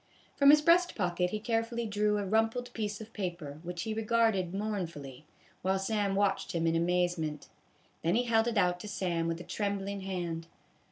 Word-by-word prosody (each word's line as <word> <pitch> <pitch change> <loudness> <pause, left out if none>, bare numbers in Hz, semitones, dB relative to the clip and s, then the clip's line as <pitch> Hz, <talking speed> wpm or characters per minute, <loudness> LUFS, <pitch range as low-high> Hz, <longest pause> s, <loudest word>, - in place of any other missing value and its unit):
From 280 0 +6
his 300 +1 +7
breast 350 +2 +4
pocket 180 -2 0
he 215 - -3
carefully 230 +1 -1
drew 210 0 +1
a 205 - -2
rumpled 225 +4 0
piece 210 -1 -3
of 220 +1 -10
paper, 175 -7 -5
which 175 0 -5
he 220 - -2
regarded 220 -4 +1
mournfully, 170 -10 -4 0.4
while 190 +1 +1
Sam 200 0 0
watched 200 -1 +1
him 165 -1 0
in 165 0 +2
amazement. 170 -3 0 0.5
Then 170 +4 +1
he 245 - +3
held 225 -1 +2
it 235 -2 -1
out 180 -2 +2
to 210 - -7
Sam 170 -5 -1
with 165 0 -2
a - - -7
trembling 200 +1 -3
hand. 175 -4 -4
195 Hz, 180 wpm, -31 LUFS, 175-220 Hz, 0.5 s, his